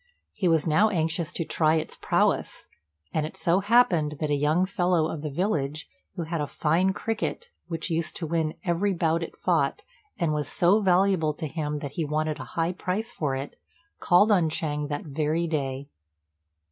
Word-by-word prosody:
He 200 -4 0
was 165 -3 +3
now 175 +7 +4
anxious 165 -2 -1
to 165 - -2
try 155 0 +2
its 160 0 -2
prowess; - - 0 0.4
and 155 - +1
it 155 - -6
so 175 +2 +2
happened 190 -8 +3
that 155 -2 -1
a - - +3
young 150 +5 +2
fellow 180 -4 +1
of 160 -2 -5
the 150 - -3
village, 150 -3 -1 0.3
who 170 - -3
had 165 -1 -3
a 145 - -2
fine 170 +7 +1
cricket 225 - -3 0.2
which 165 0 -3
used 160 -1 -1
to 170 - -4
win 160 -1 -1
every 185 +3 +1
bout 165 0 +1
it 165 - -6
fought, - - 0 0.3
and 170 -5 0
was 150 -2 -1
so 195 +5 +3
valuable 185 -4 +3
to 155 - -5
him 150 -1 -3
that 140 - -5
he 165 - -2
wanted 155 0 -1
a - - -6
high 165 +1 +2
price 195 +5 -3
for 145 - -2
it, 135 +2 -6 0.4
called 205 +5 +4
on 175 -6 +4
Ch'êng 150 -2 -2
that 145 -1 -3
very 155 +3 -1
day. 140 -4 -2
160 Hz, 185 wpm, -26 LUFS, 150-180 Hz, 0.4 s, now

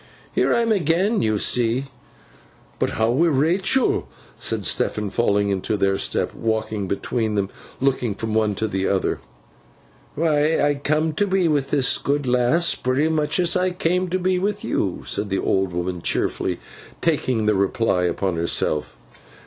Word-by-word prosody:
'Here - - +2
I 235 - +3
am 230 -1 +1
again, 190 +3 +2
you 110 -1 +1
see.' 120 +4 +1 0.9
'But - - +1
how 110 +1 +2
wi' 160 +8 +3
Rachael?' 170 - +2 0.3
said - - -3
Stephen, 105 -2 0
falling 100 -3 +1
into 100 +2 -1
their 100 -1 +2
step, - - 0
walking 110 -3 -2
between 110 +3 -2
them, 100 -1 0 0.3
and 135 - +1
looking 125 -6 0
from 110 +1 -4
the 110 - +3
one 105 -2 0
to 110 +3 -1
the 95 -2 -1
other. 95 - 0 1.0
'Why, 155 0 +2
I 145 0 +3
come 155 +2 +1
to 200 +7 0
be 190 -2 +2
with 145 -3 0
this 135 -3 +2
good 145 0 -1
lass 125 +7 +3
pretty 130 +5 0
much 155 +1 0
as 175 -1 +3
I 185 0 +2
came 180 +1 0
to 180 +1 -1
be 185 0 0
with 205 +2 -2
you,' 95 -3 -2
said 100 0 -3
the 95 - 0
old 95 -1 0
woman, 90 0 -3
cheerfully, - - -1 0.4
taking 130 -8 0
the 105 - +3
reply 95 -1 +1
upon 90 0 -1
herself. 85 -2 0
125 Hz, 170 wpm, -22 LUFS, 100-165 Hz, 1.0 s, I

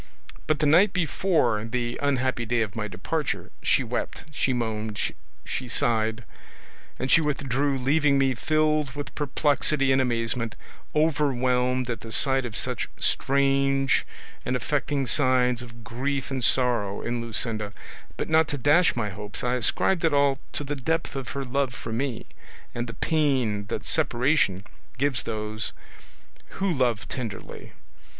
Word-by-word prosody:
But 155 - +2
the 155 - 0
night 175 +7 +5
before 165 - +1
the 120 +1 -3
unhappy 130 -3 0
day 120 0 0
of 100 -3 -7
my 110 -2 -2
departure 140 - -3
she - - +2
wept, - - -4
she 145 -3 0
moaned, 110 -3 -2 0.5
she 130 - -4
sighed, 115 -1 +1 0.7
and 130 - -2
she 170 - +6
withdrew 140 -2 0
leaving 140 +2 +3
me 135 -1 +3
filled 155 0 +1
with 145 -2 -6
perplexity 145 -1 +1
and 130 0 +4
amazement, 115 -2 -1 0.4
overwhelmed 130 -5 +2
at 115 -3 -4
the 115 - -9
sight 135 +1 +4
of 110 -3 -5
such 125 -3 +1
strange 135 0 +2 0.4
and 125 - -1
affecting 140 +2 -1
signs 125 -3 +2
of 115 -1 -11
grief 135 +4 -3
and 130 -2 -2
sorrow 115 -5 +1
in 120 0 -2
Luscinda; 110 -2 0 0.5
but - - -2
not 160 0 +4
to 145 - -3
dash 150 +7 +4
my 110 -3 -1
hopes 105 +5 -5
I 125 0 +1
ascribed 170 +8 +1
it 160 -3 +3
all 140 -1 +3
to - - -2
the 145 +1 -3
depth 150 +1 -2
of 135 -3 -4
her 140 -1 -3
love 130 -1 -1
for 115 - -7
me 125 0 -2 0.5
and 120 0 -3
the 115 - -7
pain 130 -10 +1
that 105 - -4
separation 130 - +1 0.3
gives 135 -1 +1
those 110 -1 -3 0.8
who 195 -2 0
love 120 -7 0
tenderly. 115 -6 -7
130 Hz, 150 wpm, -26 LUFS, 115-145 Hz, 0.8 s, she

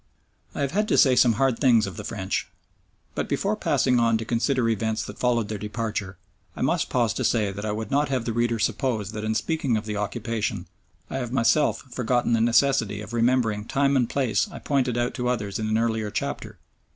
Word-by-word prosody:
I - - -3
have 140 -1 0
had 210 +5 0
to - - +2
say 130 -2 +6
some 125 -1 +5
hard 135 0 +1
things 120 -6 +4
of 95 - -7
the 105 - -7
French, 100 -3 -3 0.6
but - - -3
before - - 0
passing 125 -1 +2
on 115 -1 +3
to 110 - -5
consider 125 +3 0
the 115 - +2
events 110 0 -1
that - - -9
followed 120 -3 +1
their 105 -1 -5
departure 105 -2 -4 0.4
I - - -3
must - - +1
pause 120 -4 +1
to - - -3
say 105 -4 +1
that 100 +2 -6
I - - -1
would 110 0 -4
not 145 +1 +2
have 130 -4 -1
the 115 - -2
reader 120 0 +1
suppose 110 -2 -1
that 105 -1 -5
in 110 0 -1
speaking 130 0 0
of 105 - -5
the 105 -1 -3
occupation, 105 -2 -3 0.5
I - - -2
have 120 -3 -4
myself 125 +4 +2
forgotten 120 -1 0
the 115 - +3
necessity 115 -3 +2
of 105 - -9
remembering 115 -3 +1
time 140 +3 +1
and 125 -3 +2
place 135 - 0
I - - -8
pointed 130 -5 0
out 120 0 0
to 125 - -2
others 105 -5 -2
in 110 - -2
an 110 0 +1
earlier 110 -2 0
chapter. - - -4
115 Hz, 220 wpm, -25 LUFS, 110-125 Hz, 0.6 s, say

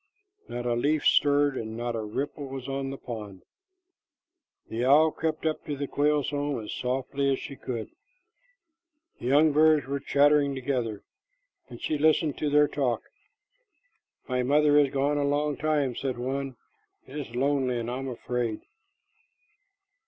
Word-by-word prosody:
Not 120 0 -4
a 120 - +1
leaf 145 +6 +1
stirred, 145 -1 +4
and 110 -1 -5
not 120 0 -2
a 115 - -2
ripple 140 +7 -4
was 135 -1 -7
on 135 0 -3
the 135 - -6
pond. 105 -7 -8 1.2
The 115 +2 -3
owl 150 +5 +5
crept 160 0 -3
up 155 -1 -1
to 145 - -4
the 140 - -2
quail's 145 0 +1
home 145 -2 -1
as 105 - -6
softly 135 +2 -1
as 135 - +1
she 140 - -8
could. 120 -5 -5 1.3
The 120 - -5
young 150 +4 +5
birds 155 -2 +4
were 140 +1 -2
chattering 145 0 +3
together, 125 -5 -2 0.7
and - - -10
she 150 - -2
listened 155 -1 +2
to 150 - 0
their 150 0 +5
talk. 125 -7 -1 1.2
"My 125 -1 0
mother 145 +3 +3
is 145 -2 +4
gone 140 +2 0
a - - +1
long 145 +1 0
time," 145 -4 0
said 130 -1 -3
one. 135 +1 -3 0.5
"It - - -12
is 125 -5 -7
lonely, 135 -1 +1
and 115 +1 -4
I 125 - -3
am 135 - -5
afraid." 120 -2 -3
140 Hz, 160 wpm, -27 LUFS, 125-145 Hz, 1.3 s, owl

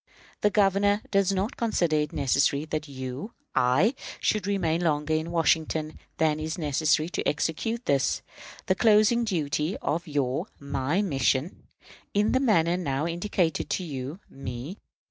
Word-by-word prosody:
"The 210 - +4
Governor 200 +1 +2
does 195 -1 +3
not 195 +3 -2
consider 175 -9 +1
it 150 -1 0
necessary 140 +1 +1
that 155 -1 -3
you 130 - -6 0.2
(I) 135 - +3 0.3
should 210 -3 0
remain 175 -5 0
longer 155 -2 +1
in 160 +1 -1
Washington 160 -1 0 0.2
than 155 -1 +2
is 155 +2 -3
necessary 155 0 +1
to - - -2
execute 225 +10 -1
this, 140 -2 +1 0.4
the - - +3
closing 220 +3 +4
duty 160 -3 -1
of 170 +3 -2
your 140 -3 -1
(my) 140 +6 -1
mission, 135 - 0 0.5
in 210 +1 +3
the 260 - +3
manner 180 -9 +3
now 140 -4 -1
indicated 170 0 -1
to 185 - -1
you 140 +1 -5
(me). 135 - -7
160 Hz, 145 wpm, -27 LUFS, 145-195 Hz, 0.5 s, The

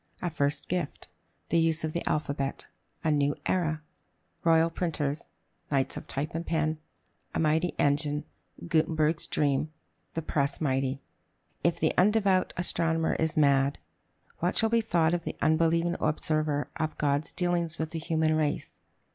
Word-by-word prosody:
A 175 - -2
First 145 -2 0
Gift. 175 -4 -3 0.4
The 170 - +3
Use 165 0 +2
of 155 -1 -2
the 170 - -2
Alphabet. 140 -2 -2 0.4
A 160 - +2
New 145 -1 +2
Era. 160 -4 0 0.6
Royal 165 0 +4
Printers. 155 -4 -2 0.4
Knights 135 -2 +1
of - - -7
Type 145 +3 -3
and 165 +1 -2
Pen. 155 -2 0 0.6
A - - +1
Mighty 160 +2 +2
Engine. 145 +1 +1 0.4
Gutenberg's 160 -1 +1
Dream. 145 +1 +1 0.4
The 165 - -3
Press 140 -2 0
mighty. 135 -2 0 0.6
If 170 0 +2
the 155 - +2
"undevout 195 -1 +3
astronomer 165 -2 +1
is 160 +1 0
mad," 140 -1 +4 0.6
what 175 +2 0
shall 225 - +4
be 230 0 +3
thought 170 -6 +2
of 175 -1 -1
the - - -4
unbelieving 165 +2 +2
observer 155 -1 0
of 155 -1 -2
God's 145 +1 +1
dealings 175 -3 0
with 160 0 -3
the 165 - -3
human 160 -1 +1
race? 150 -2 -2
160 Hz, 145 wpm, -28 LUFS, 150-170 Hz, 0.6 s, Royal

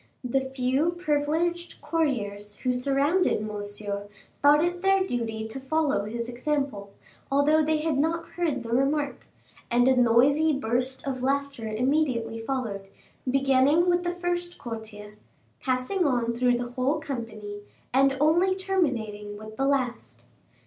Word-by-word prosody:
The 255 +2 +1
few 265 +5 +1
privileged 340 +1 -1
courtiers 210 -11 -2
who 255 -1 +1
surrounded 275 - +1
Monsieur 205 -1 -5 0.3
thought 295 +2 +6
it 350 0 -2
their 390 0 +3
duty 225 -6 -3
to 235 +4 -7
follow 285 -5 0
his 235 +2 -4
example, 250 -5 -2 0.4
although 295 +3 +4
they 310 0 +1
had 310 -3 0
not 330 +3 0
heard 315 -8 -1
the 230 - -7
remark, 275 +3 0 0.4
and 245 +1 +3
a 265 - +5
noisy 265 +6 +4
burst 255 +1 -1
of 260 -2 -3
laughter 275 -3 -1
immediately 235 -1 0
followed, 225 -5 -3 0.4
beginning 275 +5 +3
with 350 0 +1
the 350 0 -2
first 350 0 -2
courtier, 215 -3 -8 0.4
passing 260 +9 0
on 240 -5 +1
through 245 0 +2
the 240 0 -4
whole 260 +5 0
company, 225 -8 -6 0.3
and 270 +1 +4
only 345 +6 +3
terminating 235 - -2
with 215 +1 -10
the 270 +4 0
last. 255 -4 -2
265 Hz, 135 wpm, -26 LUFS, 230-310 Hz, 0.4 s, thought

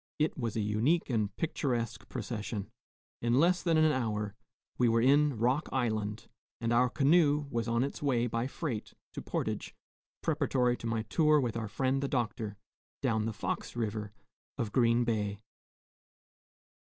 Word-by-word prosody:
It 155 +1 +1
was 115 -6 -3
a 110 - +1
unique 115 +11 +1
and 110 -3 0
picturesque 125 -8 -2
procession. 110 -3 -4 0.5
In 120 +2 +3
less 180 +3 +4
than 165 -2 +2
an 155 0 +5
hour 105 -6 -1 0.5
we 120 -1 +4
were 115 0 +3
in 140 +2 +4
Rock 125 +7 +1
Island, 110 -4 -1 0.3
and 115 0 0
our 125 +1 +4
canoe 150 +1 +3
was 115 -1 -1
on 115 +1 +2
its 140 - -4
way 125 -5 +2
by 115 +1 -1
freight 135 -6 -4 0.2
to - - -5
Portage, - - -3 0.5
preparatory 125 -2 +2
to 115 - -5
my 115 -1 -1
tour 150 +7 +3
with 120 -5 -1
our 115 -2 -2
friend 130 +6 0
the 140 - 0
Doctor, 110 -5 -2 0.5
down 110 -1 +1
the - - -1
Fox 105 - -4
River 105 -2 -2 0.5
of 110 -3 -2
Green 120 0 +3
Bay. 105 -3 -1
120 Hz, 155 wpm, -31 LUFS, 110-135 Hz, 0.5 s, an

